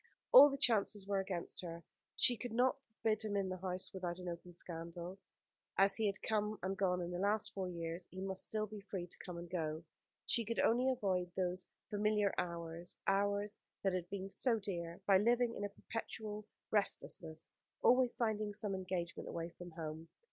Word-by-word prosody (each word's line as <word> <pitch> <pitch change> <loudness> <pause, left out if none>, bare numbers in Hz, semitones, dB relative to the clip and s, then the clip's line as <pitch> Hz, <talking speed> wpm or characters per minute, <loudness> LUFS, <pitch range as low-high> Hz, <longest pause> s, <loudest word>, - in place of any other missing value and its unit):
All 290 -13 +12
the 275 - -3
chances 210 -5 +2
were 200 -1 +1
against 190 -3 -3
her. 170 -1 -6 0.3
She 245 - +4
could 240 0 -5
not 250 +2 +3 0.3
forbid 215 -1 +3
him 200 -3 0
the 185 - -3
house 185 0 -3
without 180 -2 -3
an 180 -1 -7
open 175 +1 -7
scandal. 170 +2 -4 0.6
As 195 0 +5
he 220 -2 +2
had 195 -1 -3
come 215 -1 0
and 190 +1 0
gone 180 -2 +1
in 175 - -4
the 175 - -3
last 205 +2 +1
four 190 -2 -2
years, 170 0 -4
he 185 - -8
must 190 0 -1
still 215 -1 -1
be 210 0 -8
free 195 -3 -4
to 175 - -6
come 180 -2 -6
and 170 0 -6
go. 160 -2 -2 0.4
She 235 - +2
could 230 +1 -2
only 250 +3 +4
avoid 190 -8 0
those 180 -1 0 0.2
familiar 210 -1 +2
hours 170 0 -4
hours 205 +1 +1 0.2
that 195 -2 +2
had 180 -1 -2
been 195 -1 -3
so 230 +4 +3
dear 175 -5 -4
by 195 -2 +6
living 235 +2 +3
in - - -4
a - - -3
perpetual 215 0 -5 0.2
restlessness, 165 -6 -1 0.3
always 250 0 +5
finding 215 -3 0
some 205 -1 -1
engagement 185 -2 -3
away 165 0 -3
from 175 +1 -9
home. 160 -1 -6
195 Hz, 185 wpm, -37 LUFS, 175-215 Hz, 0.6 s, All